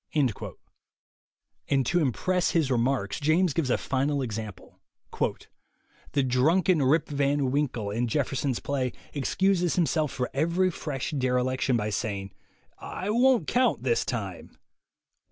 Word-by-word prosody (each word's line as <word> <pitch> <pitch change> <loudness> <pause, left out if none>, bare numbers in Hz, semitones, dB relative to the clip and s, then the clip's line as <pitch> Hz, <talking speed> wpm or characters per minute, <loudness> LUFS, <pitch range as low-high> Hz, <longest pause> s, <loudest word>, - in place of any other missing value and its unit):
And 135 -2 +2
to 175 +8 +2
impress 175 - +1
his 155 -5 +1
remarks, 120 -4 0
James 160 +2 +2
gives 150 -4 0
a - - +3
final 140 +1 -1
example: 110 -4 -7 1.3
"The 140 -1 +2
drunken 155 +7 +3
Rip 145 +4 +3
Van 140 -2 0
Winkle, 125 -7 -1
in 120 +4 -1
Jeffer 135 +3 -1
son's 130 -2 -1
play, 130 -3 -2 0.2
excuses 180 +4 +1
himself 155 -3 +1
for 125 -1 -2
every 170 +6 +1
fresh 145 -4 -4
derelic 130 -2 0
tion 125 -3 +2
by 105 -1 -2
saying, 100 -2 -3 0.5
'I 195 +3 -4
won't 245 -4 +4
count 250 +1 +2
this 470 - +2
time!' - - -5
140 Hz, 130 wpm, -27 LUFS, 125-165 Hz, 1.3 s, won't